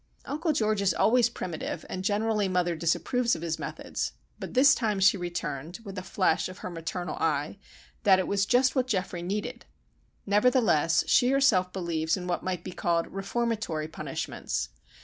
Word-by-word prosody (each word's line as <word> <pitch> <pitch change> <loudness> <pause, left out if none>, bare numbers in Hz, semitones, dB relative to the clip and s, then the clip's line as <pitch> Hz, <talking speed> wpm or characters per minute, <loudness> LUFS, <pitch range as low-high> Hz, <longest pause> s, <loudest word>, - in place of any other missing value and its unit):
Uncle 310 +4 -1
George 215 -7 +1
is 195 -1 +2
always 240 +1 +4
primitive, 175 -8 -5
and 185 - -5
generally 210 0 +1
mother 180 -2 +1
disapproves 230 +9 +1
of 160 - -7
his 165 -2 -2
methods; - - -4 0.3
but - - -7
this 275 +4 +7
time 215 -4 0
she 195 +1 +5
returned, 170 -3 -4
with 195 -3 -8
a 185 - -4
flash 185 -2 +1
of 185 - -10
her 185 - -4
maternal 170 0 -4
eye, 150 +4 -1 0.4
that 195 -4 +6
"it 185 - -1
was 195 -1 +1
just 255 +2 +3
what 260 -1 +1
Geoffrey 185 -5 -2
needed." 210 +7 -4 0.6
Nevertheless, 205 - +3
she 250 -1 +4
herself 250 -10 +3
believes 170 -2 -1
in 180 - -6
what 180 -1 -1
might 180 -2 -3
be 185 - -6
called 170 -1 -1
"reformatory" 195 -5 -2
punishments. 65 - -4
190 Hz, 170 wpm, -28 LUFS, 175-225 Hz, 0.6 s, this